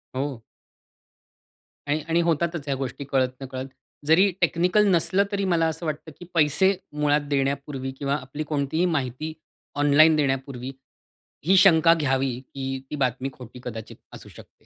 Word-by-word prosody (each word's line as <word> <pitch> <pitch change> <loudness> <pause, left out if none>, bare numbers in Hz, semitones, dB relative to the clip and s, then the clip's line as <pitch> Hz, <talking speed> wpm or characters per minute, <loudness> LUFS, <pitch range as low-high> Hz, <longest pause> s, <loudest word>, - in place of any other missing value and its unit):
हो. 135 -2 -3 1.5
आणि 150 +2 0
आणि 165 +1 +2
होतातच 170 -1 0
ह्या 140 - 0
गोष्टी. 135 +1 -5
कळत 130 -2 +2
नकळत 130 0 -5 0.4
जरी 185 +6 +5
टेक्निकल 180 +5 +3
नसलं, 190 +2 +3
तरी 200 -1 -1
मला 165 -1 +2
असं 160 +1 -4
वाटतं, 155 +1 -4
की 175 - -9
पैसे 165 +5 +3 0.2
मुळात 150 0 +3
देण्यापूर्वी 140 -1 -2
किंवा 140 0 0
आपली 145 +2 -5
कोणतीही 150 +4 0
माहिती 135 +5 -4 0.5
ऑनलाइन 155 +2 +6
देण्यापूर्वी 135 -3 -2 0.7
ही 190 +3 +5
शंका 165 -3 +6
घ्यावी, 135 -5 0
की 135 0 -5
ती 150 - -4
बातमी 130 +2 -1
खोटी 125 0 -12
कदाचित 110 -3 -7 0.2
असू - - -11
शकते. - - -17
145 Hz, 145 wpm, -24 LUFS, 135-165 Hz, 1.5 s, ऑनलाइन